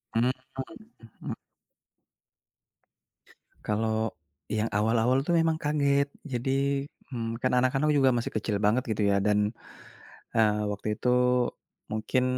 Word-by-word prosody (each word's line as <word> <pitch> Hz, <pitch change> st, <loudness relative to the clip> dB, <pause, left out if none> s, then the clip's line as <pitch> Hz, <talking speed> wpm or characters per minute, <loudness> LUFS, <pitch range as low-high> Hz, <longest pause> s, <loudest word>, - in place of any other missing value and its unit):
Mhm 120 Hz, +3 st, +3 dB, 0.3 s
mhm 135 Hz, -, -10 dB
mhm. -, -, -4 dB, 2.3 s
Kalau, 110 Hz, +1 st, 0 dB, 0.4 s
yang 110 Hz, +1 st, 0 dB
awal-awal 115 Hz, +5 st, +2 dB
tuh 175 Hz, -, +1 dB
memang 165 Hz, -1 st, +3 dB
kaget. 140 Hz, -2 st, +2 dB, 0.2 s
Jadi, 135 Hz, +1 st, 0 dB, 0.3 s
mmm, 115 Hz, -2 st, -3 dB
kan 130 Hz, -, +1 dB
anak-anak 130 Hz, +4 st, +2 dB
juga 140 Hz, -3 st, +4 dB
masih 120 Hz, -, -2 dB
kecil 110 Hz, -1 st, 0 dB
banget 110 Hz, +4 st, +3 dB
gitu 110 Hz, -, -1 dB
ya 100 Hz, -, +3 dB
dan, 105 Hz, +1 st, +2 dB, 0.8 s
eee, 105 Hz, -1 st, +3 dB
waktu 105 Hz, +1 st, -5 dB
itu 125 Hz, -, 0 dB, 0.8 s
mungkin 110 Hz, +4 st, 0 dB
120 Hz, 115 wpm, -28 LUFS, 110-135 Hz, 2.3 s, juga